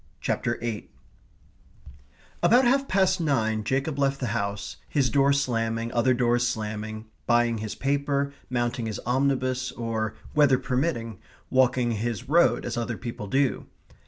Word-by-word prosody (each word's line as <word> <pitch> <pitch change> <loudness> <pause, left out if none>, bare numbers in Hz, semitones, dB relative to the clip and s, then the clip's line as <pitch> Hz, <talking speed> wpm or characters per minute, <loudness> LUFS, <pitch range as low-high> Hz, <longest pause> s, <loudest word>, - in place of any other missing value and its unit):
CHAPTER 120 - -1
EIGHT 115 -3 -4 1.5
About 245 +3 +5
half 275 +3 +3
past 190 -1 +2
nine 110 -8 +1
Jacob 135 +6 -1
left 135 0 +1
the 120 -5 -2
house, 100 0 -3
his 135 -5 +1
door 140 +1 +4
slamming, 115 -4 0
other 125 +2 +3
doors 120 0 +2
slamming, 110 0 -4 0.2
buying 120 -1 +3
his 110 -1 -5
paper, 140 0 0 0.2
mounting 120 -2 -1
his 110 - -3
omnibus, 130 0 0
or, 110 -2 -3 0.2
weather 145 -3 +5
permitting, 125 - -2 0.3
walking 125 -2 +3
his 115 +2 -3
road 170 +5 +3
as - - -3
other 120 -1 -2
people 115 0 -6
do. 135 +4 0
120 Hz, 135 wpm, -26 LUFS, 115-140 Hz, 1.5 s, About